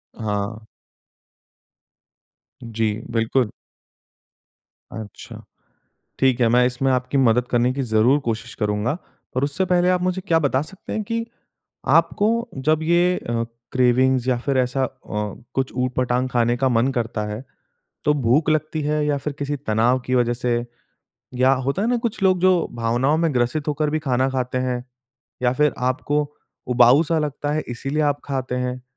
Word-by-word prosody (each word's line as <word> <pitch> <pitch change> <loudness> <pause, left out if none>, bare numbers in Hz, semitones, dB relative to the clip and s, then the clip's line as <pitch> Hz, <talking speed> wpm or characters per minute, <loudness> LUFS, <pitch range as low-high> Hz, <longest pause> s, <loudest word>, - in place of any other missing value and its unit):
हाँ। 105 0 -3 2.0
जी, 115 -2 -1 0.2
बिल्कुल। 115 +1 +1 1.4
अच्छा, 110 -2 -9 0.8
ठीक 130 -2 +3
है 120 - +5
मैं 125 +1 +4
इसमें 125 +2 0
आपकी 130 +2 0
मदद 125 -1 +3
करने 120 +1 +2
की 135 - -2
ज़रूर 120 +4 +3
कोशिश 115 +1 -3
करूँगा, 105 +6 -1 0.4
और 130 - +1
उससे 145 +7 0
पहले 180 0 +3
आप 180 -1 +2
मुझे 185 +1 -1
क्या 165 -3 +4
बता 140 -3 +1
सकते 190 +5 -8
हैं 215 - -2
कि 230 +2 -2 0.7
आपको 205 0 +1 0.4
जब 155 0 +3
ये 175 +2 +3
अ, 115 0 -2 0.3
क्रेविंग्स 130 0 +3
या 125 - +3
फिर 135 +2 -1
ऐसा 130 +1 +1
अ, - - -1 0.7
कुछ 135 -1 -1
उट-पटांग 125 0 0
खाने 120 0 +2
का 130 +1 +1
मन 120 +1 +2
करता 115 -3 -2
है 105 +4 -5 0.6
तो 150 - +3
भूख 145 +4 +2
लगती 155 0 0
है 150 +1 0
या 145 - +1
फिर 150 +2 -4
किसी 145 0 -2
तनाव 120 0 +1
की 130 - 0
वज़ह 120 -1 +2
से, 120 -1 -1 0.7
या 130 +1 +3
होता 135 +7 -1
है 225 - +1
ना 245 - +2
कुछ 230 -2 -3
लोग 185 -1 +4
जो 185 -2 +3
भावनाओं 120 +6 +1
में 165 -2 +1
ग्रसित 125 +5 0
होकर 150 0 0
भी 155 +1 0
खाना 130 -3 +1
खाते 130 -1 -2
हैं? 125 -1 -1 0.6
या 125 - +4
फिर 150 +2 +2
आपको 130 +4 0 0.5
उबाऊ-सा 135 +7 +5
लगता 145 -1 -2
है 155 - 0
इसलिए 135 +5 -2
आप 145 -1 +1
खाते 130 -2 -3
हैं। 125 0 -3
130 Hz, 160 wpm, -22 LUFS, 120-150 Hz, 2.0 s, है